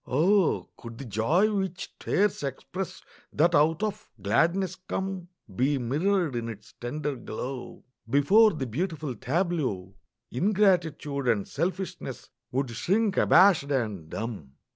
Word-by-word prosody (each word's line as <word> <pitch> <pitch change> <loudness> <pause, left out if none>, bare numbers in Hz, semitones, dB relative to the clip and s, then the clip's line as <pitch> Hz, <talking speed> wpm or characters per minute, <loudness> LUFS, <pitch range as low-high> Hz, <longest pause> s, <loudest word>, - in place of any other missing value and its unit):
Oh, 180 +7 +2
could 115 -2 -10
the 140 - -7
joy 150 - +2
which 190 -2 -3
tears 205 0 +1
express 160 +7 -5 0.3
That 170 +4 +3
out 160 +5 +3
of 215 0 -3
gladness 170 - +1
come 190 -1 -4 0.3
Be 135 +6 +2
mirrored 155 +5 0
in 115 -1 -3
its 105 -2 -10
tender 145 +4 -3
glow, 125 +2 -6 0.3
Before 195 - +5
the 150 -5 -3
beautiful 155 - -3
tableau 135 - -1 0.4
Ingratitude 170 - +1
and 105 -4 +1
selfishness 180 -4 -4 0.2
Would 130 -1 -1
shrink 195 - +1
abashed 175 -6 +5
and 105 - -2
dumb! 105 - -6
150 Hz, 120 wpm, -27 LUFS, 120-185 Hz, 0.4 s, Before